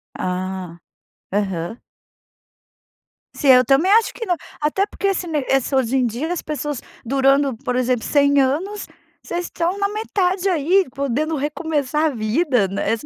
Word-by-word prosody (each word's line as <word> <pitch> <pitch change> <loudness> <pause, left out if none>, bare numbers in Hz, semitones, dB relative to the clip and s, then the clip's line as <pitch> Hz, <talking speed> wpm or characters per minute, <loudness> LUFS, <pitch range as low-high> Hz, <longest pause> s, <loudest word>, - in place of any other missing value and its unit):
Ah! 185 -1 -4 0.5
Aham. 195 0 -2 1.5
Sim, 280 - 0
eu 255 -1 +7
também 275 +10 +3
acho 455 0 +4
que 460 - -6
não, 360 -4 +1 0.2
até 305 +7 +1
porque 400 - -3
esse 375 -2 -1
me 310 -3 -1
esse 270 0 +1
hoje 260 -1 +1
em 255 - +2
dia 255 +9 -3
as 355 - -3
pessoas 295 -3 -4 0.2
durando, 275 0 +2
por 250 0 -3
exemplo, 250 -2 0
100 285 -1 +3
anos. 345 +11 -1 0.3
Vocês 350 +1 -4
estão 345 +3 -2
na 400 0 0
metade 400 -3 -1
aí, 360 +3 +3
podendo 280 +4 -1
recomeçar 300 0 -1
a - - +3
vida, 245 - +1
né, 195 +2 -1
esse 225 -1 -2
280 Hz, 155 wpm, -21 LUFS, 245-345 Hz, 1.5 s, eu